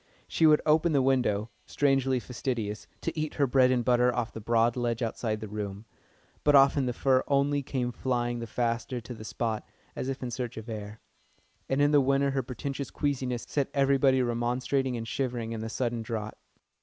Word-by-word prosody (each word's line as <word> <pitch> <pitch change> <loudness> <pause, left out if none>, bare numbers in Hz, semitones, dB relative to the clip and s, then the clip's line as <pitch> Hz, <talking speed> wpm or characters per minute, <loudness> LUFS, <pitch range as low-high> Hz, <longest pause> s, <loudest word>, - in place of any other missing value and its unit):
She 160 - +3
would 150 -1 +5
open 155 +2 +3
the 140 - +4
window 120 -5 +1 0.2
strangely 135 -2 +2
fastidious 120 -4 -4
to 165 - -3
eat 155 -1 -3
her 145 - +3
bread 130 0 +4
and 125 -2 +1
butter 125 0 +4
off 120 -1 -3
the 110 - -7
broad 115 +2 +2
ledge 120 -1 -1
outside 110 -1 -2
the 110 - -5
room, 105 0 -5 0.6
but 145 -1 +5
often 135 -1 +5
the - - +1
fur 130 +1 +2
only 140 0 +2
came 130 -2 -2
flying 120 -1 -1
the 115 - -5
faster 120 +2 -1
to 120 +2 -8
the 110 - -10
spot, 110 -1 -2 0.3
as 130 - -3
if 135 -1 -4
in 125 - -3
search 120 0 -4
of 110 +1 -7
air; 105 -1 -7 0.7
and 135 +2 +2
in 145 - +4
the 145 -1 +6
winter 140 +1 +2
her 135 0 0
pretentious 135 +3 -5
queasiness 130 -4 -2
set 140 -2 -1
everybody 135 -1 +3
remonstrating 125 +2 0
and 115 0 -5
shivering 120 -2 -2
in 115 -1 -4
the 110 - -4
sudden 120 0 -2
draught. 110 -2 -4
125 Hz, 195 wpm, -28 LUFS, 115-135 Hz, 0.7 s, the